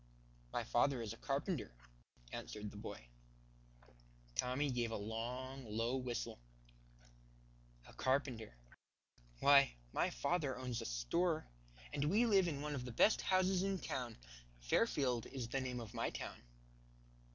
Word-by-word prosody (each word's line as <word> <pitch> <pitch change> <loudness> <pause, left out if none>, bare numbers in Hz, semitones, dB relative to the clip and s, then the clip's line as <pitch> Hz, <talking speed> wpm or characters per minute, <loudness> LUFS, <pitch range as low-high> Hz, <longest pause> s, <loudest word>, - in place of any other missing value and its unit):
"My - - -1
father 135 - +3
is 115 -2 -3
a - - -11
carpenter," 140 - -1 0.6
answered 100 - -5
the - - -13
boy. - - -7 1.3
Tommy 130 - +1
gave 120 -2 0
a 110 - -2
long, 125 +5 -4
low 115 +4 0
whistle. 125 - -3 1.5
"A - - -14
carpenter! 130 - 0 0.9
Why 140 - +7 0.2
my - - +2
father 135 - 0
owns 125 -2 -2
a - - -5
store, 155 - +1 0.5
and 140 - +1
we 205 +10 +4
live 195 -5 +5
in 145 -4 -2
one 150 0 -2
of 130 -3 -3
the 125 - -5
best 205 - +5
houses 185 0 +3
in 195 0 +1
town. 125 -8 -3 0.4
Fairfield 120 - +2
is 130 -4 -5
the 135 +2 0
name 125 -1 -2
of 115 -1 -7
my 115 - 0
town." - - -6
130 Hz, 140 wpm, -38 LUFS, 115-145 Hz, 1.5 s, Why